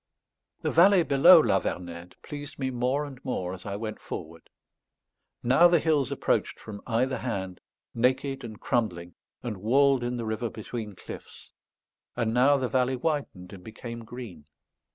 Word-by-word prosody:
The -, -, 0 dB
valley 180 Hz, +2 st, +6 dB
below 140 Hz, -3 st, +7 dB
La -, -, +3 dB
Vernède 85 Hz, 0 st, -5 dB
pleased 145 Hz, -1 st, -8 dB
me 130 Hz, -1 st, -2 dB
more 130 Hz, +4 st, 0 dB
and 135 Hz, -2 st, -11 dB
more 90 Hz, -8 st, -3 dB
as 95 Hz, +1 st, -9 dB
I 100 Hz, -, -3 dB
went 110 Hz, +1 st, -5 dB
forward. 80 Hz, -1 st, -8 dB, 0.9 s
Now 135 Hz, +8 st, +6 dB
the 175 Hz, 0 st, +4 dB
hills 150 Hz, -5 st, +1 dB
approached -, -, 0 dB
from 105 Hz, -2 st, -9 dB
either 125 Hz, +2 st, 0 dB
hand, 95 Hz, -7 st, -4 dB, 0.3 s
naked 130 Hz, +3 st, 0 dB
and 110 Hz, -3 st, -8 dB
crumbling, 90 Hz, -8 st, -1 dB, 0.3 s
and 115 Hz, -4 st, -4 dB
walled 135 Hz, +5 st, +3 dB
in 120 Hz, 0 st, -2 dB
the 115 Hz, -, -4 dB
river 110 Hz, +2 st, -2 dB
between 110 Hz, -1 st, -7 dB
cliffs; -, -, -11 dB, 0.6 s
and 115 Hz, -2 st, 0 dB
now 135 Hz, +4 st, +5 dB
the 130 Hz, -2 st, -1 dB
valley 130 Hz, 0 st, +1 dB
widened 125 Hz, -, -3 dB
and 95 Hz, -2 st, -11 dB
became 115 Hz, +2 st, -8 dB
green. 110 Hz, -10 st, -9 dB
120 Hz, 155 wpm, -27 LUFS, 105-135 Hz, 0.9 s, below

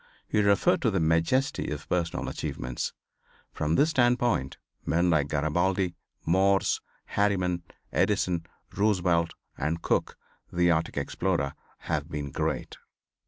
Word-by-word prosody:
He 105 Hz, -, +2 dB
referred 100 Hz, -1 st, +3 dB
to 120 Hz, -, +3 dB
the 95 Hz, -3 st, +1 dB
majesty 85 Hz, -, +1 dB
of 75 Hz, 0 st, -5 dB
personal 85 Hz, -2 st, -1 dB
achievements. 60 Hz, -1 st, -3 dB, 0.6 s
From 75 Hz, +1 st, 0 dB
this 155 Hz, -, +4 dB
standpoint 120 Hz, -, +2 dB, 0.3 s
men 85 Hz, +2 st, +2 dB
like 75 Hz, -3 st, +3 dB
Garabaldi, 90 Hz, +5 st, +1 dB, 0.3 s
Morse, 95 Hz, +3 st, +3 dB, 0.2 s
Harriman, 95 Hz, -4 st, +1 dB, 0.3 s
Edison, 85 Hz, -2 st, +1 dB, 0.3 s
Roosevelt 90 Hz, -5 st, +2 dB, 0.2 s
and 80 Hz, +3 st, -1 dB
Cook, -, -, 0 dB, 0.3 s
the 85 Hz, 0 st, +3 dB
Arctic 80 Hz, 0 st, 0 dB
explorer 85 Hz, -7 st, -1 dB, 0.3 s
have 75 Hz, -1 st, -2 dB
been 75 Hz, -3 st, -4 dB
great. -, -, -2 dB
85 Hz, 120 wpm, -28 LUFS, 80-100 Hz, 0.6 s, this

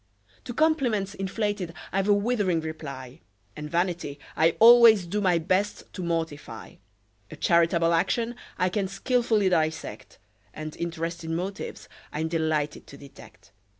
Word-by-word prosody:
To 245 Hz, -, -5 dB
compliments 250 Hz, -11 st, +1 dB
inflated 195 Hz, -3 st, -3 dB, 0.2 s
I've 195 Hz, +1 st, 0 dB
a 205 Hz, -, +5 dB
withering 205 Hz, -5 st, +1 dB
reply; 140 Hz, -, -8 dB, 0.3 s
And 150 Hz, 0 st, -7 dB
vanity 170 Hz, -4 st, -2 dB, 0.2 s
I 160 Hz, +2 st, +3 dB
always 230 Hz, -4 st, +8 dB
do 205 Hz, +5 st, -2 dB
my 180 Hz, -3 st, +3 dB
best 185 Hz, +5 st, -1 dB
to 190 Hz, -, -6 dB
mortify; 160 Hz, -9 st, -4 dB, 0.5 s
A -, -, -9 dB
charitable 170 Hz, +1 st, +3 dB
action 230 Hz, +8 st, 0 dB, 0.2 s
I 185 Hz, -, +1 dB
can 195 Hz, +1 st, -1 dB
skilfully 220 Hz, 0 st, +1 dB
dissect: 160 Hz, -3 st, -2 dB, 0.4 s
And 155 Hz, 0 st, -6 dB
interested 165 Hz, 0 st, -4 dB
motives 180 Hz, +4 st, -5 dB, 0.2 s
I'm 160 Hz, +2 st, -2 dB
delighted 155 Hz, -2 st, -1 dB
to 140 Hz, -, -12 dB
detect. 140 Hz, 0 st, -15 dB
175 Hz, 130 wpm, -26 LUFS, 160-205 Hz, 0.5 s, always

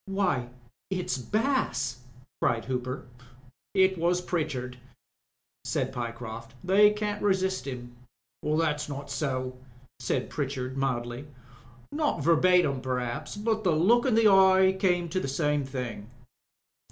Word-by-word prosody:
"Why, 185 Hz, -11 st, 0 dB, 0.4 s
it*s 185 Hz, -8 st, -2 dB
Bass," 210 Hz, -, 0 dB, 0.4 s
cried 115 Hz, -, +1 dB
Hooper. 130 Hz, 0 st, -3 dB, 0.7 s
"It 190 Hz, -2 st, +4 dB
was 175 Hz, +2 st, +2 dB
Pritchard," 135 Hz, -8 st, -3 dB, 0.8 s
said 130 Hz, 0 st, -2 dB
Pyecroft. 115 Hz, -1 st, -6 dB
"They 200 Hz, +3 st, +6 dB
can't 210 Hz, 0 st, -3 dB
resist 190 Hz, -7 st, 0 dB
him." 120 Hz, -2 st, -7 dB, 0.5 s
"That's 150 Hz, -1 st, 0 dB
not 140 Hz, 0 st, -6 dB
so," 130 Hz, -3 st, -2 dB, 0.4 s
said 125 Hz, +1 st, -2 dB
Pritchard, 130 Hz, -3 st, -3 dB
mildly. 125 Hz, 0 st, -2 dB, 0.6 s
"Not 295 Hz, -, 0 dB
verbatim 170 Hz, -3 st, +4 dB
per'aps, 125 Hz, -, -3 dB
but 215 Hz, +1 st, -1 dB
the 180 Hz, -, +3 dB
look 230 Hz, -, +4 dB
in 245 Hz, -, +3 dB
the 225 Hz, -1 st, +5 dB
eye 190 Hz, -1 st, +6 dB
came 180 Hz, -2 st, +2 dB
to 185 Hz, -, -1 dB
the 135 Hz, -, -3 dB
same 145 Hz, +1 st, 0 dB
thing." 125 Hz, -5 st, -5 dB
150 Hz, 120 wpm, -28 LUFS, 125-190 Hz, 0.8 s, They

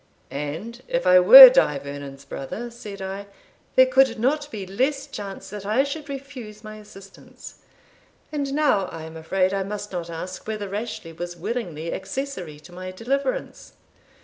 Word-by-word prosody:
"And 160 Hz, -, -6 dB
if 255 Hz, 0 st, -1 dB
I 180 Hz, 0 st, +7 dB
were 255 Hz, +9 st, +12 dB
Die 150 Hz, -, +3 dB
Vernon's 140 Hz, 0 st, -9 dB
brother," 220 Hz, -, -6 dB
said 210 Hz, -5 st, -9 dB
I, 195 Hz, +1 st, -6 dB, 0.5 s
"there 260 Hz, -, +7 dB
could 260 Hz, -1 st, +3 dB
not 290 Hz, +6 st, 0 dB
be 210 Hz, -8 st, -6 dB
less 265 Hz, +9 st, -1 dB
chance 200 Hz, -2 st, -8 dB
that 205 Hz, -1 st, -7 dB
I 215 Hz, +7 st, +2 dB
should 285 Hz, +1 st, -6 dB
refuse 260 Hz, -6 st, -9 dB
my 215 Hz, 0 st, -9 dB
assistance 200 Hz, -2 st, -14 dB, 0.7 s
And 285 Hz, -2 st, -3 dB
now 295 Hz, -10 st, +2 dB
I 165 Hz, -2 st, -8 dB
am 160 Hz, 0 st, -10 dB
afraid 185 Hz, +4 st, 0 dB
I 195 Hz, -, -1 dB
must 205 Hz, +1 st, -5 dB
not 175 Hz, -2 st, -5 dB
ask 180 Hz, +4 st, -7 dB
whether 215 Hz, -2 st, -4 dB
Rashleigh 200 Hz, -4 st, -6 dB
was 175 Hz, 0 st, -6 dB
willingly 170 Hz, -5 st, -4 dB
accessory 190 Hz, -, -6 dB
to 175 Hz, -, -15 dB
my 185 Hz, +1 st, -7 dB
deliverance?" 275 Hz, -, -3 dB
205 Hz, 160 wpm, -23 LUFS, 180-255 Hz, 0.7 s, were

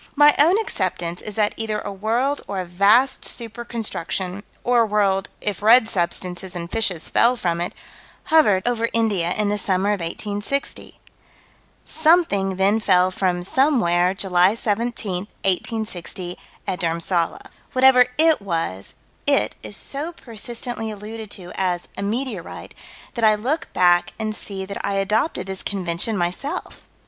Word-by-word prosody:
My 295 Hz, 0 st, +7 dB
own 335 Hz, +7 st, +6 dB
acceptance 185 Hz, -, -2 dB
is 210 Hz, -, -6 dB
that 210 Hz, -1 st, +1 dB
either 220 Hz, -1 st, -2 dB
a 205 Hz, -, -5 dB
world 235 Hz, +8 st, -1 dB
or 195 Hz, -, -3 dB
a 185 Hz, -, -3 dB
vast 200 Hz, +9 st, +3 dB
super 235 Hz, 0 st, -3 dB
construction 195 Hz, -4 st, -4 dB, 0.2 s
or 245 Hz, -1 st, +3 dB
a -, -, +4 dB
world, 200 Hz, -2 st, +1 dB
if 205 Hz, -2 st, -2 dB
red 225 Hz, +2 st, +6 dB
substances 180 Hz, 0 st, -2 dB
and 170 Hz, -1 st, -6 dB
fishes 190 Hz, -7 st, -1 dB
fell 240 Hz, +2 st, +3 dB
from 170 Hz, -7 st, -1 dB
it 175 Hz, -, -2 dB, 0.6 s
hovered 210 Hz, -11 st, +4 dB
over 230 Hz, -1 st, +1 dB
India 205 Hz, -7 st, +1 dB
in 210 Hz, -1 st, +1 dB
the 205 Hz, 0 st, 0 dB
summer 195 Hz, 0 st, +1 dB
of 205 Hz, -1 st, +1 dB
1860. 205 Hz, +10 st, -4 dB, 0.9 s
Something 315 Hz, -, +2 dB
then 195 Hz, +3 st, +2 dB
fell 185 Hz, -3 st, +3 dB
from 180 Hz, -2 st, -1 dB
somewhere, 190 Hz, -, +2 dB
July 190 Hz, 0 st, +3 dB
17, 210 Hz, -4 st, -2 dB, 0.2 s
1860, 190 Hz, -2 st, -2 dB, 0.3 s
at 180 Hz, -, -3 dB
Dhurmsalla. 170 Hz, 0 st, -1 dB, 0.3 s
Whatever 255 Hz, -1 st, +6 dB
"it" 315 Hz, -4 st, +4 dB
was, 165 Hz, -, -3 dB, 0.3 s
"it" -, -, +2 dB
is 105 Hz, -1 st, -6 dB
so 300 Hz, +5 st, -4 dB
persistently 235 Hz, -2 st, -5 dB
alluded 215 Hz, +1 st, -7 dB
to 180 Hz, -3 st, -7 dB
as 180 Hz, -2 st, -2 dB
"a -, -, -5 dB
meteorite" 215 Hz, -2 st, -4 dB, 0.4 s
that 235 Hz, -, -4 dB
I 215 Hz, -1 st, +6 dB
look 260 Hz, +10 st, -2 dB
back 175 Hz, -1 st, +3 dB
and 215 Hz, -1 st, -2 dB
see 195 Hz, -3 st, -6 dB
that 200 Hz, +1 st, -6 dB
I 200 Hz, -, -1 dB
adopted 210 Hz, +9 st, 0 dB
this 190 Hz, 0 st, -5 dB
convention 190 Hz, +2 st, -1 dB
myself. 180 Hz, +11 st, -4 dB
205 Hz, 145 wpm, -22 LUFS, 180-230 Hz, 0.9 s, My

